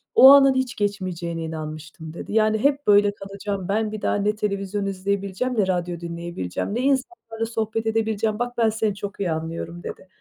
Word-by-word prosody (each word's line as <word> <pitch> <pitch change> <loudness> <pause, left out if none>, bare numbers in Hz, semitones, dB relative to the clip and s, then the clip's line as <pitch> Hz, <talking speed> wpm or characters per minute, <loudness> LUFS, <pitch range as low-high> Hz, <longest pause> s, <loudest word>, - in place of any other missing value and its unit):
"O 265 - +10
anın 275 -1 +8
hiç 260 -3 -1
geçmeyeceğine 185 -5 -2
inanmıştım." 155 0 -7
dedi. 175 - -7
"Yani 215 0 +3
hep 280 +2 +1
böyle 205 0 +5
kalacağım, 195 -1 -5
ben 215 +1 0
bir 215 - -6
daha - - +1
ne 205 +1 +1
televizyon 200 -1 -2
izleyebileceğim, 200 +5 -2
ne 195 - +3
radyo 175 -2 -1
dinleyebileceğim, 170 - -4
ne 240 - 0
insanlarla 265 -4 -1
sohbet 225 0 -2
edebileceğim, 220 -1 0
bak 245 0 -3
ben 230 -1 +4
seni 215 -2 -1
çok 200 -1 -6
iyi 185 -4 0
anlıyorum." 165 +2 -4
dedi. - - -8
205 Hz, 175 wpm, -23 LUFS, 175-225 Hz, -, O